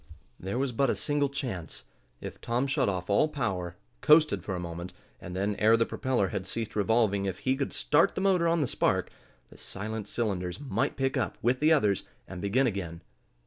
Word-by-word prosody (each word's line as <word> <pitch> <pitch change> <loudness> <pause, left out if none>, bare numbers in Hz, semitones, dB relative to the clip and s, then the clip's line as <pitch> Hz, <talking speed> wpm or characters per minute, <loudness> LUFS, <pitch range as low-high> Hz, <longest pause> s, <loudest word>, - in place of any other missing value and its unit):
There 95 +5 -3
was 135 0 0
but 130 +3 +1
a - - +1
single 145 -1 0
chance. 115 - -5 0.4
If - - -8
Tom 120 +3 0
shut 140 -4 +1
off 90 -2 -3
all 100 +9 +3
power, 95 - -3 0.3
coasted 155 0 +5
for 95 - -3
a - - -3
moment, 85 +1 -6 0.3
and 90 +1 -8
then, 100 +2 0
ere 110 +2 +5
the 115 - +2
propeller 125 -8 0
had 95 -1 -4
ceased 115 -2 -4
revolving, 105 -2 +2
if 95 -2 -2
he 130 +6 0
could 140 0 -2
start 150 +2 +2
the - - -2
motor 185 -3 +3
on 165 -1 +2
the 140 - +1
spark, - - 0 0.4
the - - -15
silent 110 +1 -5
cylinders 95 -6 -2
might 140 0 -1
pick 135 0 0
up, 130 - -1
with 125 +3 +2
the 155 +2 +4
others, 105 - +3 0.3
and 95 -2 -7
begin 115 +7 +2
again. 90 -7 -3
115 Hz, 200 wpm, -29 LUFS, 95-135 Hz, 0.4 s, coasted